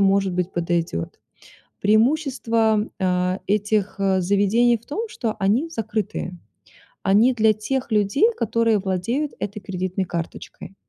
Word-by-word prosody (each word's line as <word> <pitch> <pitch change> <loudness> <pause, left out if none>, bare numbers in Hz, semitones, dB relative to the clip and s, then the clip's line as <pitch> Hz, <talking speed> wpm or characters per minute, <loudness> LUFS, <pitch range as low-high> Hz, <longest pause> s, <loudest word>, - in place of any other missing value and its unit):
может 195 -1 +3
быть, 180 +1 -1
подойдёт. 170 - -2 0.6
Преимущество, 225 -2 +2
а, 180 0 0
этих 205 0 0 0.2
заведений 205 +6 +3
в 225 - -25
том, 435 +9 -4
что 230 - -3
они 215 +10 +2
закрытые. 210 - -3 0.7
Они 215 +6 +4
для 220 -2 +4
тех 245 +4 -3
людей, 210 - +3
которые 230 -1 +2
владеют 205 +10 -2
этой 205 +1 -4
кредитной 185 0 -3
карточкой. 175 +2 -7
210 Hz, 115 wpm, -22 LUFS, 190-230 Hz, 0.7 s, Они